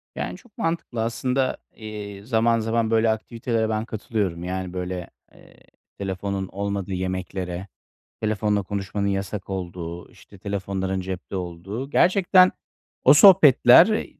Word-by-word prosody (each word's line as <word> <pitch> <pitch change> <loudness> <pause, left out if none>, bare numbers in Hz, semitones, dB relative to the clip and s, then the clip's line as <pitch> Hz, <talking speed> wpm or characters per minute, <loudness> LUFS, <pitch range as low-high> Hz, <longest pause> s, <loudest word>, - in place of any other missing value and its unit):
Yani, - - -4
çok 245 -5 -22
mantıklı 165 -9 -2
aslında. 125 +3 -1 0.2
Eee, 105 -2 -8
zaman 115 0 +2
zaman 115 0 0
böyle 115 0 +3
aktivitelere 110 0 -2
ben 110 0 -1
katılıyorum. 105 -6 -3
Yani, 90 0 -4
böyle, 90 -1 -4 0.2
eee, - - -19 0.4
telefonun 95 0 -3
olmadığı 100 0 -4
yemeklere, 95 0 -4 0.5
telefonla 105 -1 0
konuşmanın 100 +1 -3
yasak 100 0 -3
olduğu, 90 -2 -6
işte, 100 - -17
telefonların 95 -1 -3
cepte 95 +1 -6
olduğu. 95 +8 -5
Gerçekten 185 +3 +5 0.5
o 135 - +8
sohbetler, 160 - +7
100 Hz, 120 wpm, -23 LUFS, 95-115 Hz, 0.5 s, o